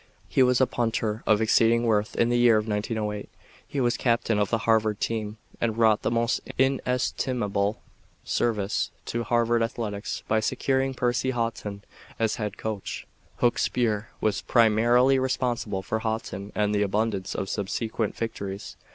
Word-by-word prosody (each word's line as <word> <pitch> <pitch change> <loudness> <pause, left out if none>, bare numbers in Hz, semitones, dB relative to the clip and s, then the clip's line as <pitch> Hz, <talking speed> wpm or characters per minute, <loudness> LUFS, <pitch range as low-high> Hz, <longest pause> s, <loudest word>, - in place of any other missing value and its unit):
He - - +2
was 125 -1 +4
a 130 - +5
punter 115 -3 -1
of 110 0 +4
exceeding 115 +1 +4
worth. 105 -2 +1
In 115 - +2
the 120 - +2
year 120 -2 +6
of 105 +1 -1
1908 105 0 -2 0.4
he 140 0 -3
was 120 -2 +1
captain 115 -3 +1
of 100 -1 +1
the 115 - +2
Harvard 110 -2 +2
team 110 -1 -2 0.2
and 115 -1 0
wrought 110 -2 +4
the - - 0
most 115 0 +1 0.2
inestimable 125 -5 0 0.4
service 105 -3 0 0.2
to 120 - -2
Harvard 120 0 +2
athletics 110 -3 -3
by 110 - +2
securing 130 +3 0
Percy 125 +1 0
Haughton 115 -5 -3 0.3
as 110 -1 0
Head 105 -2 -4
Coach. 110 -3 -5 0.4
Hooks 120 -1 +3
Burr 110 -3 0
was 105 -2 0
primarily 120 +3 +4
responsible 120 -6 -1
for 110 +4 -2
Haughton 110 -2 -4
and 105 0 +1
the 105 - +1
abundance 105 -1 -1
of 95 - -2
subsequent 110 +2 -2
victories. 100 -3 -5
115 Hz, 150 wpm, -26 LUFS, 105-120 Hz, 0.4 s, year